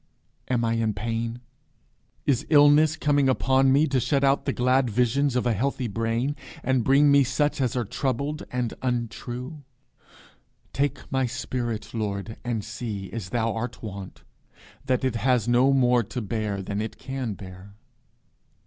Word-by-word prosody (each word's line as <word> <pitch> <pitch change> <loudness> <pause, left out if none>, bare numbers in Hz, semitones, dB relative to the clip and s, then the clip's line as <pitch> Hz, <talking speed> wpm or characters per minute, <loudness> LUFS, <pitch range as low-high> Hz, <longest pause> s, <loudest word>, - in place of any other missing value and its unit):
Am 120 -2 +1
I 115 - +1
in 110 -2 0
pain? 115 +2 -3 0.8
Is 140 0 +1
illness 150 +1 +6
coming 145 -2 +2
upon 130 +1 +3
me 140 +3 +5
to 135 -3 +1
shut 140 +3 +1
out 135 0 +2
the 140 - +1
glad 125 0 +2
visions 125 +4 +1
of 125 - +1
a 120 - +2
healthy 130 +3 -1
brain, 115 +6 -1 0.3
and 130 -1 +1
bring 140 +4 +5
me 140 0 +6
such 145 +2 0
as 125 -3 0
are 120 -2 0
troubled 140 +7 -2
and 125 -2 -2
untrue? 125 +3 -4 1.1
Take 140 -1 0
my 130 -1 +1
spirit, 120 -3 -4
Lord, 105 -1 -3
and 115 -4 -2
see, 105 -3 -5
as 110 -6 -5
thou 115 -2 0
art 120 +2 -5
wont, 100 -3 -8 0.6
that 130 -1 0
it 130 -3 0
has 125 -2 +1
no 125 +3 +4
more 125 -2 +4
to 115 +3 -5
bear 105 -2 -3
than 100 +2 -3
it 110 - -5
can 130 -5 -4
bear. 95 +1 -11
125 Hz, 155 wpm, -25 LUFS, 115-135 Hz, 1.1 s, illness